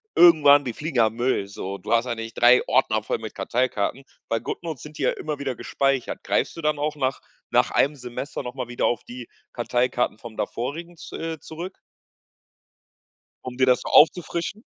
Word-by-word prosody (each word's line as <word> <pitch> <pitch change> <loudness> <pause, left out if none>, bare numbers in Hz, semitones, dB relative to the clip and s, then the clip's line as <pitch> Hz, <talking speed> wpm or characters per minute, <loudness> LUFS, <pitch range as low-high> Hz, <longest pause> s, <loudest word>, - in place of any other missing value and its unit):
irgendwann 145 -5 +7
die 120 - -3
fliegen 150 -4 -5
ja 110 -2 +6
in 110 - -5
Müll, 120 -5 0
so. 100 0 -6
Du 100 - -7
hast 115 +1 +3
ja 120 -2 -2
nicht 115 0 -6
3 120 +1 +6
Ordner 110 -4 +2
voll - - -2
mit 110 -1 -8
Karteikarten. 125 +1 -1 0.3
Bei 115 - +1
Goodnotes 155 +3 -5
sind 150 0 -11
die - - -3
ja - - +3
immer 150 -2 -4
wieder 135 -3 -3
gespeichert. 135 0 -1
Greifst - - 0
du - - -5
dann 150 -1 0
auch 150 0 -1
nach 135 -2 -1 0.3
nach - - +3
1 145 +2 +2
Semester 125 +3 -6
noch 125 +1 -7
mal 125 -2 -4
wieder 120 - -1
auf 120 - 0
die 120 -1 -9 0.3
Karteikarten 125 -1 0
vom 110 -1 -10
vorherigen, 165 +8 -4
z - - -9
äh, 165 -1 -4
zurück? 175 +4 -8 1.7
Um 125 -1 -6
dir 130 0 +3
das 125 -1 +4
so - - -6
aufzufrischen? 170 +5 +3
130 Hz, 195 wpm, -24 LUFS, 120-150 Hz, 1.7 s, irgendwann